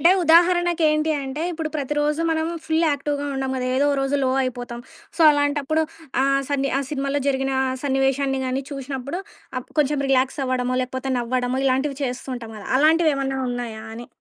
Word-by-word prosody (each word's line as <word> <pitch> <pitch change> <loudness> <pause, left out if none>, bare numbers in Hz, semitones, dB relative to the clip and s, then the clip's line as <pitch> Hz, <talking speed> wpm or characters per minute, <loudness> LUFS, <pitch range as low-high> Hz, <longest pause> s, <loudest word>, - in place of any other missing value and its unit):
అంటే 340 +4 +6
ఉదాహరణకి 345 +1 +4
ఏంటి 305 +1 +1
అంటే 270 +4 -4
ఇప్పుడు 320 -1 -3
ప్రతిరోజు 295 +2 0
మనం 320 0 0 0.2
ఫుల్ 320 +1 +1
యాక్టివ్‌గా 285 0 -2
ఉండం 270 0 -2
గదా! 255 -1 -2
ఏదో 280 +2 +3
ఓ - - +1
రోజు 270 +1 +1
లో 260 - +2
అయిపోతాం. 245 -1 -4 0.4
సో, - - -6
అలాంటప్పుడు 290 +1 +1 0.4
ఆహ్, 275 0 +3
సన్ని 275 -1 0
ఆ - - 0
సినిమాలో 280 -1 -1
జరిగిన 270 0 0 0.3
సన్నివేశాన్ని 270 0 +1
గాని 260 +1 -1
చూసినప్పుడు 275 +2 -5
అప్పుడు 330 -9 -9
అప్ - - -16
కొంచెం 290 0 +1
రిలాక్సవ్వడమో, 255 -1 +1
లేకపోతే 260 +1 -4
నవ్వడమో 250 +2 -1
ఇలాంటివి 270 +2 +1
చేస్తూ 250 0 -3
ఉంటాం 230 -2 -9
గదా! 205 - -9
అలాంటివేమన్నా 295 -3 +3
ఉన్నాయా 235 -3 -5
అని? 240 +1 -8
275 Hz, 165 wpm, -23 LUFS, 255-295 Hz, 0.4 s, అంటే